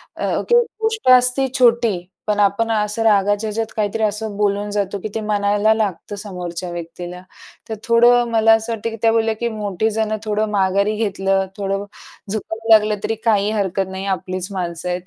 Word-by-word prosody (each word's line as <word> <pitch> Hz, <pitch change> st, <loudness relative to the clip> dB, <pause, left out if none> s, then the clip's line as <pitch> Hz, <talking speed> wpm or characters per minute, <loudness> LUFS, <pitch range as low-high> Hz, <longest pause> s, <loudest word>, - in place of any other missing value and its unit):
अ, -, -, -1 dB
ती 475 Hz, -, +5 dB, 0.3 s
गोष्ट 445 Hz, -9 st, 0 dB
असते 250 Hz, +1 st, +4 dB
छोटी, 235 Hz, -4 st, +3 dB, 0.3 s
पण 210 Hz, -1 st, 0 dB
आपण 205 Hz, +3 st, +2 dB
असं 210 Hz, 0 st, -1 dB
रागाच्या 205 Hz, 0 st, +2 dB
ह्याच्यात 220 Hz, +1 st, -3 dB
काहीतरी 215 Hz, +1 st, -1 dB
असं 210 Hz, 0 st, -2 dB
बोलून 205 Hz, 0 st, 0 dB
जातो, 200 Hz, -1 st, -2 dB
की 205 Hz, -, -5 dB
ते 220 Hz, -, -1 dB
मनाला 210 Hz, 0 st, +2 dB
लागतं 205 Hz, -3 st, -3 dB
समोरच्या 180 Hz, -3 st, -6 dB
व्यक्तीला. 175 Hz, +1 st, -7 dB, 0.5 s
तर 220 Hz, -, -3 dB
थोडं 240 Hz, +1 st, +4 dB
मला 225 Hz, 0 st, +5 dB
असं 225 Hz, +1 st, 0 dB
वाटतं, 225 Hz, +1 st, -3 dB
की 225 Hz, -, -7 dB
त्या 225 Hz, -, +4 dB
बोलल्या 225 Hz, 0 st, +1 dB
की 235 Hz, -, -1 dB
"मोठी 210 Hz, -1 st, -2 dB
जणं 215 Hz, 0 st, -1 dB
थोडं 215 Hz, 0 st, -1 dB
माघारी 200 Hz, +1 st, +1 dB
घेतलं, 195 Hz, -3 st, 0 dB
थोडं 195 Hz, 0 st, -2 dB, 0.5 s
झुकाव 220 Hz, +1 st, -5 dB
लागलं 215 Hz, -1 st, +5 dB
तरी 225 Hz, -, -1 dB
काही 210 Hz, -2 st, +2 dB
हरकत 195 Hz, -3 st, -1 dB
नाही, 190 Hz, +1 st, -6 dB
आपलीच 185 Hz, -1 st, -3 dB
माणसं 175 Hz, -2 st, -4 dB
आहेत." 180 Hz, 0 st, -2 dB
210 Hz, 175 wpm, -19 LUFS, 195-225 Hz, 0.5 s, ती